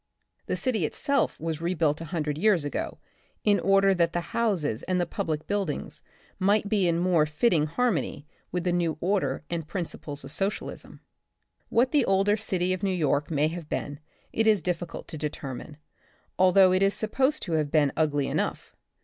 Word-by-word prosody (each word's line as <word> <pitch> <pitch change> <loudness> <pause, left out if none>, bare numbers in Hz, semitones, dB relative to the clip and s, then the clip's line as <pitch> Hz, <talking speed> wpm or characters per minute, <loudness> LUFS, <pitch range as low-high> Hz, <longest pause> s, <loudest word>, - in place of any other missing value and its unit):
The - - 0
city 235 -8 0
itself 280 - 0
was 160 0 -3
rebuilt 165 -3 0
a - - -5
hundred 150 -2 -2
years 180 -2 +2
ago, 145 - -3 0.5
in 205 -1 +4
order 195 0 +4
that 170 -2 +1
the 175 +5 -4
houses 190 - 0
and 185 -1 -1
the 175 - +1
public 155 -3 -3
buildings 200 -7 -2 0.4
might 205 +2 +2
be 200 -3 +2
in 170 -1 +2
more 170 -3 +3
fitting 155 0 +2
har 245 +10 +1
mony 160 -5 -3 0.3
with 180 -1 -2
the 180 - +1
new 170 -3 0
order 175 -9 0
and 165 -2 -3
principles 155 -5 -5
of 135 - -9
Socialism. 195 +6 -3 0.7
What 245 +3 +3
the 290 -3 +4
older 195 +2 +3
City 185 -4 -1
of 185 - -4
New 200 - +1
York 150 -5 +1
may 155 -1 +2
have 165 -2 -7
been, 145 0 -3 0.3
it 225 0 +1
is 215 -3 +4
difficult 175 -1 -3
to 160 - -6
determine, 145 -1 -5 0.6
although 185 0 +6
it 185 - +2
is 195 0 +3
supposed 265 +7 0
to 175 - -5
have 155 -2 +1
been 145 -2 +3
ugly 145 -3 +1
enough. - - -3
175 Hz, 180 wpm, -27 LUFS, 155-200 Hz, 0.7 s, although